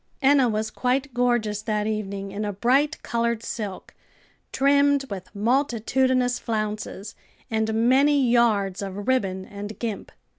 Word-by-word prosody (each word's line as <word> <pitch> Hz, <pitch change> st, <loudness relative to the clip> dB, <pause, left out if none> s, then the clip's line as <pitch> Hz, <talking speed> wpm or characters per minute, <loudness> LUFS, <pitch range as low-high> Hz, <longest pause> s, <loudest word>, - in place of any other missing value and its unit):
Enna 270 Hz, -2 st, +4 dB
was 215 Hz, 0 st, -2 dB
quite 260 Hz, +2 st, -1 dB
gorgeous 240 Hz, -4 st, +1 dB
that 210 Hz, -1 st, -1 dB
evening, 200 Hz, -2 st, -3 dB
in 205 Hz, +2 st, -4 dB
a 205 Hz, -, -2 dB
bright 265 Hz, +9 st, +1 dB
colored 235 Hz, -1 st, -1 dB
silk, 205 Hz, -6 st, -6 dB, 0.6 s
trimmed 280 Hz, 0 st, +3 dB
with 190 Hz, -2 st, -6 dB
multitudinous 250 Hz, +2 st, +1 dB
flounces 215 Hz, -2 st, -4 dB, 0.4 s
and 220 Hz, 0 st, 0 dB, 0.2 s
many 280 Hz, +3 st, +4 dB
yards 215 Hz, -6 st, +2 dB
of 200 Hz, +1 st, -6 dB
ribbon 195 Hz, -8 st, 0 dB
and 205 Hz, +2 st, -8 dB
gimp. 225 Hz, -4 st, -5 dB
225 Hz, 125 wpm, -24 LUFS, 205-260 Hz, 0.6 s, Enna